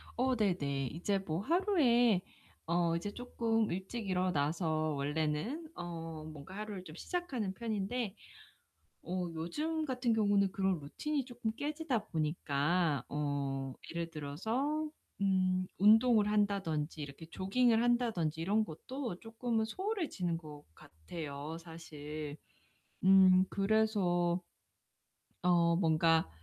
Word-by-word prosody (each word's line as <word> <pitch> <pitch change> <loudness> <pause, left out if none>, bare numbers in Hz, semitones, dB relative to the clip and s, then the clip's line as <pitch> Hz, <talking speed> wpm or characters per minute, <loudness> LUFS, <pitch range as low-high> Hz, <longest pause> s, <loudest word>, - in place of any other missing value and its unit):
어 255 +1 +2
네네. 140 - 0
이제 195 +5 0
뭐 170 -3 -3
하루에 245 - +3 0.5
어 170 0 +2
이제 175 +5 -3
쪼끔 225 -3 0
일찍 195 +5 -4
일어나서 160 -3 +1
원래는 155 - -1
어 165 -2 -6
뭔가 155 +5 -10
하루를 210 -3 -5
좀 155 -3 -11
시작하는 260 - -2
편인데 220 0 -2 0.9
어 180 0 -2
요즘 305 - -2
같은 250 -4 0
경우는 200 -3 +3
그런 190 -3 +1
루틴이 275 - -2
쪼끔 245 -3 -3
깨지다 295 -5 -2
보니까 155 0 0
어 140 -2 -2 0.2
예를 170 0 -3
들어서 225 - -2 0.3
음 185 -1 +2
운동을 215 +1 +6
한다든지 185 -8 0
이렇게 145 +3 -8
조깅을 225 +7 +2
한다든지 225 -10 +1
이런 205 +6 +2
것도 225 - -5
쪼끔은 225 +1 -1
소홀해지는 315 - -2
것 150 -3 -11
같아요 145 - -7
사실. 155 -3 -7 0.7
음 185 -1 +7
그래서 195 -4 +2 1.0
어 170 -1 +4
뭔가 165 - +3
185 Hz, 245 characters per minute, -34 LUFS, 160-225 Hz, 1.0 s, 음